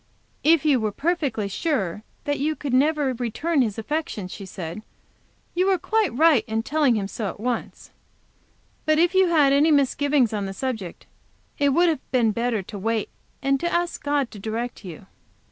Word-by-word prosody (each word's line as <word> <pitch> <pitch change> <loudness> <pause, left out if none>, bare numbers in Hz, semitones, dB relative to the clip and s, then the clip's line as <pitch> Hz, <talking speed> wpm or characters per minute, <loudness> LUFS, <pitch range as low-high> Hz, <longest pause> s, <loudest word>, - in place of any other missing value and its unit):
"If 315 0 +4
you 285 -4 +4
were 215 -2 -1
perfectly 280 - -1
sure 210 - -2 0.2
that 290 0 -1
you 305 +3 0
could 280 -4 -4
never 290 0 +2
return 255 +6 0
his 220 -4 -1
affection," 225 -5 -3
she 190 +1 -9
said, 175 +1 -6 0.7
"you 365 +2 +1
were 385 -1 +3
quite 435 +4 +1
right 310 -5 +5
in 220 0 -1
telling 285 -2 +2
him 200 -2 -1
so 210 +1 -4
at 195 - -6
once; 240 +1 -4 1.0
But 310 0 +4
if 345 +3 +3
you 380 -1 +5
had 300 -5 +4
any 290 +3 +4
misgivings 280 -3 +2
on 205 -2 -2
the 195 - -6
subject, 220 -9 -5 0.5
it 285 -1 +3
would 345 +6 +4
have 315 -5 -2
been 235 -4 +3
better 230 -1 -1
to 200 +2 -8
wait, 220 +1 -1 0.3
and 275 0 +2
to 345 - -1
ask 345 0 -1
God 285 -3 0
to 210 - -10
direct 225 +3 -4
you." 180 0 -9
265 Hz, 180 wpm, -24 LUFS, 220-310 Hz, 1.0 s, right